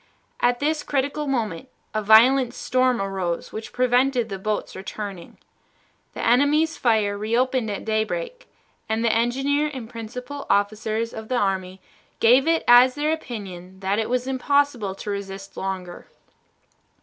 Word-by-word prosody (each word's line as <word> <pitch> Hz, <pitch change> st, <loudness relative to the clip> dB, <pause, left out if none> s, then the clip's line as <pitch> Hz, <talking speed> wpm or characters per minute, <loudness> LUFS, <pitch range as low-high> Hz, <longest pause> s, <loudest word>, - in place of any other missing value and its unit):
At 245 Hz, 0 st, +2 dB
this 305 Hz, +1 st, 0 dB
critical 285 Hz, +2 st, -2 dB
moment 235 Hz, -4 st, -2 dB, 0.2 s
a 215 Hz, -, 0 dB
violent 235 Hz, +5 st, +5 dB
storm 255 Hz, -1 st, +1 dB
arose 190 Hz, -3 st, -3 dB
which 220 Hz, 0 st, -6 dB
prevented 250 Hz, -1 st, +2 dB
the 195 Hz, -1 st, -5 dB
boats 210 Hz, +2 st, -3 dB
returning. 195 Hz, -2 st, -7 dB, 0.8 s
The -, -, -3 dB
enemy's 290 Hz, +7 st, +3 dB
fire 215 Hz, -4 st, +1 dB
reopened 235 Hz, +3 st, 0 dB
at 200 Hz, -, -5 dB
daybreak, -, -, -2 dB, 0.4 s
and 220 Hz, +1 st, 0 dB
the 230 Hz, -, +3 dB
engineer 270 Hz, +6 st, +1 dB
and 255 Hz, -5 st, -7 dB
principal 250 Hz, +5 st, -7 dB
officers 215 Hz, +3 st, 0 dB
of 220 Hz, 0 st, -7 dB
the 255 Hz, -, 0 dB
army 190 Hz, -3 st, -1 dB, 0.4 s
gave 255 Hz, +6 st, +5 dB
it 330 Hz, 0 st, +2 dB
as 245 Hz, +1 st, +7 dB
their 300 Hz, +1 st, 0 dB
opinion 190 Hz, -, -7 dB
that 195 Hz, +2 st, 0 dB
it 220 Hz, -, -2 dB
was 250 Hz, 0 st, 0 dB
impossible 265 Hz, -5 st, 0 dB
to 205 Hz, -, -5 dB
resist 195 Hz, 0 st, -6 dB
longer. 185 Hz, -2 st, -5 dB
230 Hz, 140 wpm, -23 LUFS, 205-265 Hz, 0.8 s, as